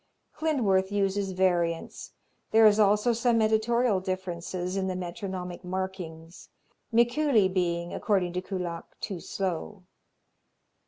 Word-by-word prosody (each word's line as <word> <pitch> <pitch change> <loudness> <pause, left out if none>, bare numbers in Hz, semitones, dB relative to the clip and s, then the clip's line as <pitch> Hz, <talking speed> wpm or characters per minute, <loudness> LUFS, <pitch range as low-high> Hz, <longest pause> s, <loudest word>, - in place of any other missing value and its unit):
Klindworth 205 -12 +1
uses 195 -1 0
variants. 175 -3 0 0.4
There 225 0 +6
is 210 0 +6
also 210 +3 +4
some 235 0 +2
editorial 220 0 +2
differences 185 -1 -4
in 190 -1 -1
the 185 - -2
metronomic 180 0 -5
markings, 180 -3 -6 0.4
Mikuli 240 -1 +3
being, 175 -2 -1
according 185 -4 0
to 180 - -2
Kullak, 180 -3 -6
too 195 -5 -4
slow. 190 +2 -4
190 Hz, 110 wpm, -28 LUFS, 180-215 Hz, 0.4 s, There